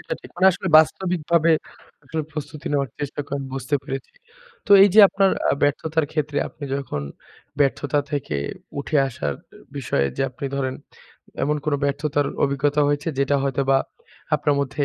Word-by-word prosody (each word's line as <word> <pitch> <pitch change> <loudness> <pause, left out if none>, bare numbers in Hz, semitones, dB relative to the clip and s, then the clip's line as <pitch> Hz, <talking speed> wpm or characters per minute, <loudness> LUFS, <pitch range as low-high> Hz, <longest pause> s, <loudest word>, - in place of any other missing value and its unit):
এটা - - -4
ঠিক। - - -13
মানে 185 +2 +4
আসলে 190 - -4
বাস্তবিকভাবে 170 -1 +2 0.5
আপনার 160 -1 -3
প্রস্তুতি 150 0 -7
নেওয়ার 140 -4 0
চেষ্টা 145 0 -4
করেন 140 0 -3
বুঝতে 135 +2 -2
পেরেছি। 135 -2 -6 0.5
তো - - -13
এই 200 - +7
যে 220 - +9
আপনার 195 -1 +2 0.2
আ - - +3
ব্যর্থতার 155 +2 +1
ক্ষেত্রে 150 -2 -1
আপনি 150 - -10
যখন 120 - -4 0.6
ব্যর্থতা 145 +1 +1
থেকে 135 - -2 0.4
উঠে 150 - -1
আসার 70 - -3 0.4
বিষয়ে 70 - 0
যে - - 0
আপনি 135 +2 -6
ধরেন, 130 -1 -1 0.7
এমন 150 +1 +1
কোন 150 -2 +1
ব্যর্থতার 145 0 0 0.2
অভিজ্ঞতা 140 +2 +1
হয়েছে? 145 +2 -1
যেটা 140 +1 +2
হয়তোবা 135 0 +1 0.6
আপনার 145 -1 +1
মধ্যে 140 +1 -1
145 Hz, 155 wpm, -22 LUFS, 135-155 Hz, 0.7 s, যে